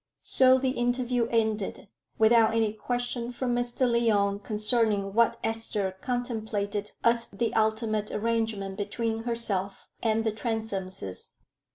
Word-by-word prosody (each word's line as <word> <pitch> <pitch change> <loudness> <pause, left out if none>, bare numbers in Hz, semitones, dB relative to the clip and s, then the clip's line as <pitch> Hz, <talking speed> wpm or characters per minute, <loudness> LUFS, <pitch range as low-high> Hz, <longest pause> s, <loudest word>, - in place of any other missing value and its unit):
So 260 0 +6
the 260 0 0
interview 245 -1 0
ended, 220 -3 -1 0.3
without 225 0 +5
any 220 -2 +1
question 245 +1 -3
from 245 0 -2
Mr. 245 +1 -1
Lyon 210 -4 +2
concerning 210 -2 +1
what 230 +1 +3
Esther 225 -3 -1
contemplated 220 -4 -3
as 235 0 +3
the 225 +3 -3
ultimate 220 -1 0
arrangement 220 -3 -2
between 225 +2 -3
herself 205 -5 -2
and 225 -1 +1
the 220 - +1
Transomes. 200 - -4
225 Hz, 115 wpm, -27 LUFS, 210-235 Hz, 0.3 s, So